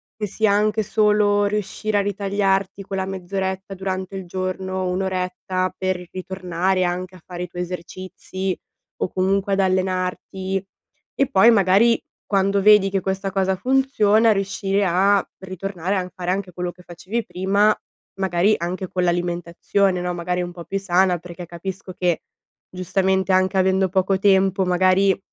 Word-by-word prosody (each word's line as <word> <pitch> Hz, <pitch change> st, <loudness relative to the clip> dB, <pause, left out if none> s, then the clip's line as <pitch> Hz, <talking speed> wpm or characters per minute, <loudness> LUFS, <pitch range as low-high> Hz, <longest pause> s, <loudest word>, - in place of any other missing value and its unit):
che 215 Hz, -2 st, -3 dB
sia 215 Hz, +2 st, +1 dB
anche 210 Hz, +1 st, +2 dB
solo 210 Hz, 0 st, +3 dB
riuscire 210 Hz, +1 st, -2 dB
a -, -, +3 dB
ritagliarti 195 Hz, -1 st, 0 dB
quella 190 Hz, -1 st, -3 dB
mezz'oretta 190 Hz, +1 st, -4 dB
durante 190 Hz, 0 st, -4 dB
il 190 Hz, -, -5 dB
giorno, 185 Hz, +1 st, -3 dB
1 180 Hz, +1 st, -1 dB
oretta 185 Hz, 0 st, -2 dB
per 185 Hz, -1 st, -2 dB
ritornare 185 Hz, 0 st, -1 dB
anche 180 Hz, +1 st, -3 dB
a 180 Hz, -, -15 dB
fare 180 Hz, -1 st, -6 dB
i -, -, -5 dB
tuoi 175 Hz, +1 st, -4 dB
esercizi 185 Hz, +1 st, -5 dB, 0.4 s
o -, -, -2 dB
comunque 195 Hz, +2 st, +1 dB
ad 195 Hz, -, +1 dB
allenarti. 185 Hz, 0 st, -1 dB, 0.5 s
E 275 Hz, -, +1 dB
poi 195 Hz, +4 st, +6 dB
magari 210 Hz, +3 st, +4 dB, 0.3 s
quando 195 Hz, 0 st, +2 dB
vedi 210 Hz, -1 st, +6 dB
che 195 Hz, -1 st, 0 dB
questa 195 Hz, +1 st, -2 dB
cosa 190 Hz, 0 st, +1 dB
funziona, 225 Hz, -2 st, +3 dB
riuscire 195 Hz, 0 st, 0 dB
a 195 Hz, +2 st, +3 dB
ritornare 190 Hz, 0 st, -4 dB
a 180 Hz, -1 st, -3 dB
fare 180 Hz, -1 st, -4 dB
anche 190 Hz, -1 st, -2 dB
quello 180 Hz, +1 st, -3 dB
che 180 Hz, 0 st, -18 dB
facevi 185 Hz, +7 st, -4 dB
prima, 200 Hz, +3 st, +2 dB, 0.4 s
magari 190 Hz, +2 st, +2 dB
anche 180 Hz, +2 st, -3 dB
con 180 Hz, -, -1 dB
l'alimentazione, 175 Hz, +2 st, 0 dB
no, 180 Hz, 0 st, -2 dB
magari 180 Hz, +1 st, -2 dB
un 175 Hz, -, -5 dB
po' 170 Hz, -1 st, -9 dB
più 195 Hz, -, -2 dB
sana, 185 Hz, -1 st, +2 dB
perché 175 Hz, +1 st, -9 dB
capisco 185 Hz, +3 st, -7 dB
che, 175 Hz, -3 st, +1 dB, 0.5 s
giustamente, 190 Hz, +1 st, 0 dB
anche 185 Hz, +1 st, +2 dB
avendo 190 Hz, 0 st, +3 dB
poco 190 Hz, +1 st, +1 dB
tempo, 195 Hz, -1 st, +3 dB
magari, 185 Hz, +2 st, +3 dB
190 Hz, 150 wpm, -22 LUFS, 180-195 Hz, 0.5 s, poi